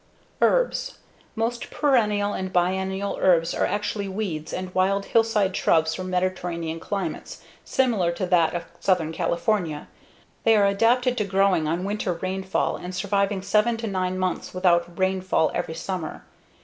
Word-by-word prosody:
Herbs - - +1 0.4
Most 235 +1 -2
perennial 210 -8 +2
and 185 0 -4
biennial 190 +2 0
herbs 170 -2 +3
are - - +1
actually 205 -1 -2
weeds 190 -6 -4
and 185 0 -5
wild 195 +2 +1
hillside 220 -4 +2
shrubs 160 -1 +2
from 185 +2 -5
Mediterranean 175 -3 -2
climates 195 +3 -5 0.2
similar 225 -10 +1
to 180 +2 -2
that 175 -2 +2
of 170 0 -3
Southern 175 -5 +1
California. 170 -1 -1 0.6
They 225 - +5
are 205 - +4
adapted 240 +5 +2
to - - +2
growing 195 -4 +2
on 170 +3 -1
winter 200 -2 -1
rainfall 190 +2 -2
and 180 +1 -7
surviving 200 0 0
seven 215 +4 +2
to 230 - -5
nine 185 -3 -1
months 185 0 -2
without 175 -1 +2
rainfall 190 -3 +1
every 160 - -3
summer. 180 -4 -5
190 Hz, 145 wpm, -24 LUFS, 175-205 Hz, 0.6 s, They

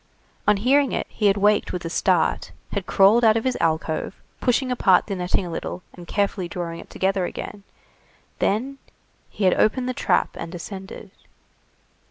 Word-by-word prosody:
On 210 -1 +5
hearing 270 +6 +3
it, - - -1
he 210 - +1
had 200 0 +3
waked 205 +1 +2
with 180 -2 -5
a - - -2
start, - - +1 0.2
had - - -3
crawled 210 +4 +5
out 220 0 +5
of 225 - -2
his 260 - 0
"alcove," 160 +2 -1 0.2
pushing 255 +1 +1
apart 190 -7 +4
the 200 - -4
netting 180 +1 -1
a 175 - -6
little, 175 +2 -5
and 175 -1 -12
carefully 200 -3 -1
drawing 170 -2 -5
it - - -12
together 190 -1 0
again, 200 - -7 0.8
then 260 +7 0 0.5
he 205 - -5
had 185 - +5
opened 250 +4 +1
the 255 - -1
trap, - - +1
and 165 - -6
descended. 190 +2 -8
200 Hz, 175 wpm, -23 LUFS, 180-225 Hz, 0.8 s, On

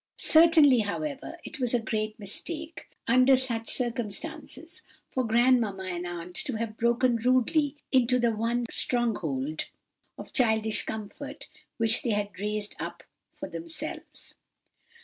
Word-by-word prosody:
Certainly, 315 -5 +6
however, 275 +9 -3
it 310 - -8
was 245 -1 +1
a - - +3
great 215 -1 -3
mistake, 315 - -4 0.2
under 255 +3 +6
such 235 -3 0
circumstances, 295 - -4 0.3
for 260 - -1
grandmamma 230 -4 +2
and 180 -1 -4
aunt 175 0 -7
to 270 - -2
have 220 -1 -4
broken 235 +1 +2
rudely 255 +5 +2 0.2
into 250 -1 +4
the 240 -1 +2
one 235 +2 0
stronghold 155 - 0 0.5
of - - -10
childish 220 -3 +2
comfort, 275 +7 -6 0.3
which 225 0 +3
they 240 - -2
had 205 -2 -3
raised 210 0 -3
up - - -6 0.3
for - - -6
themselves." 325 -1 -6
235 Hz, 130 wpm, -28 LUFS, 215-265 Hz, 0.5 s, Certainly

